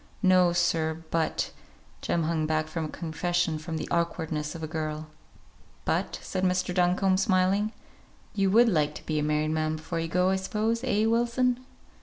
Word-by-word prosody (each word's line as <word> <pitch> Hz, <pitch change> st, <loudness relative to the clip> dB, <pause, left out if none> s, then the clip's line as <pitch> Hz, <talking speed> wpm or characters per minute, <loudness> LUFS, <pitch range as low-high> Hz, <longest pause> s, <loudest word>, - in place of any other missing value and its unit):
"No, 185 Hz, -2 st, +5 dB
sir, 165 Hz, -2 st, 0 dB
but 165 Hz, -1 st, 0 dB, 0.2 s
" -, -, -30 dB
Jem 170 Hz, -, 0 dB
hung 155 Hz, -1 st, 0 dB
back 155 Hz, 0 st, 0 dB
from 160 Hz, 0 st, -3 dB
a -, -, -5 dB
confession 170 Hz, 0 st, -1 dB
with 160 Hz, +1 st, -5 dB
the 155 Hz, -, -4 dB
awkwardness 160 Hz, -3 st, -1 dB
of 165 Hz, -, -7 dB
a -, -, -2 dB
girl. 155 Hz, 0 st, -3 dB, 0.8 s
"But -, -, 0 dB
" -, -, -18 dB
said 185 Hz, -1 st, -3 dB
Mr. 180 Hz, -1 st, +1 dB
Duncombe, 185 Hz, +1 st, +3 dB
smiling, 190 Hz, +2 st, +2 dB, 0.6 s
"you 195 Hz, -2 st, +2 dB
would 235 Hz, +5 st, +6 dB
like 150 Hz, -7 st, +1 dB
to -, -, -10 dB
be 155 Hz, -1 st, 0 dB
a -, -, 0 dB
married 150 Hz, 0 st, +1 dB
man 155 Hz, 0 st, 0 dB
before 160 Hz, +2 st, -4 dB
you 165 Hz, -, -2 dB
go, 180 Hz, +3 st, +2 dB
I 190 Hz, -, +2 dB
suppose; 220 Hz, +5 st, -1 dB
eh, 220 Hz, -4 st, +2 dB
Wilson?" 240 Hz, +2 st, +1 dB
175 Hz, 185 wpm, -27 LUFS, 155-190 Hz, 0.8 s, would